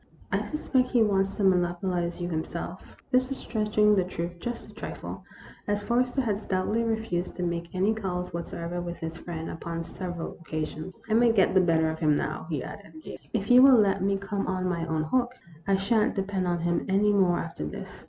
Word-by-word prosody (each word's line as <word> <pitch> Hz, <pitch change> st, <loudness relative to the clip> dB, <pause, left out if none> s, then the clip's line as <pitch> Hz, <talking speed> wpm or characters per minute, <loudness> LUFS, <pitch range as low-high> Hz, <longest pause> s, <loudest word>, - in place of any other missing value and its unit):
I -, -, +1 dB
suspect 260 Hz, -4 st, 0 dB
he 240 Hz, -3 st, +4 dB
wants 195 Hz, -2 st, +1 dB
to 210 Hz, -, -2 dB
monopolize 175 Hz, -1 st, +1 dB
you 175 Hz, -, -2 dB
himself." 170 Hz, +2 st, -5 dB
This 255 Hz, 0 st, +3 dB
was 270 Hz, -, -3 dB
stretching 210 Hz, -1 st, +2 dB
the 190 Hz, -, +3 dB
truth 175 Hz, -1 st, -5 dB
just 240 Hz, +5 st, -5 dB
a -, -, -18 dB
trifle, -, -, -7 dB, 0.4 s
as 205 Hz, 0 st, 0 dB
Forrester 250 Hz, +3 st, +1 dB
had 210 Hz, -5 st, 0 dB
stoutly 210 Hz, +2 st, 0 dB
refused 220 Hz, -6 st, -2 dB
to 180 Hz, -, -3 dB
make 170 Hz, -1 st, -2 dB
any 195 Hz, +4 st, +3 dB
calls 180 Hz, -5 st, -3 dB
whatsoever 170 Hz, +1 st, -4 dB
with 175 Hz, 0 st, -5 dB
his 160 Hz, 0 st, -5 dB
friend 165 Hz, -2 st, -6 dB
upon 165 Hz, 0 st, -4 dB
several 175 Hz, -1 st, -6 dB
occasions. 155 Hz, +2 st, -5 dB
" -, -, -24 dB
I -, -, +4 dB
may 235 Hz, +1 st, +5 dB
get 200 Hz, -4 st, +3 dB
the 190 Hz, -, +6 dB
better 165 Hz, -2 st, +3 dB
of 160 Hz, -, -6 dB
him 150 Hz, -3 st, +3 dB
now," 155 Hz, +1 st, -3 dB
he 150 Hz, -5 st, -2 dB
added, 205 Hz, -, -10 dB
gaily, -, -, -8 dB
"if 215 Hz, 0 st, -1 dB
you 250 Hz, +1 st, +9 dB
will 265 Hz, -1 st, +8 dB
let 195 Hz, -3 st, +3 dB
me 195 Hz, +1 st, +2 dB
come 200 Hz, 0 st, -3 dB
on 185 Hz, 0 st, -1 dB
my 170 Hz, -2 st, -1 dB
own 160 Hz, -1 st, 0 dB
hook. 245 Hz, +9 st, 0 dB, 0.3 s
I 195 Hz, -, +4 dB
sha' 200 Hz, +3 st, +2 dB
n't -, -, 0 dB
depend 195 Hz, -2 st, -1 dB
upon 175 Hz, -1 st, 0 dB
him 170 Hz, 0 st, 0 dB
any 205 Hz, +2 st, +3 dB
more 185 Hz, -3 st, +4 dB
after 165 Hz, -, -4 dB
this." 75 Hz, -, -7 dB
185 Hz, 210 wpm, -27 LUFS, 170-210 Hz, 0.4 s, you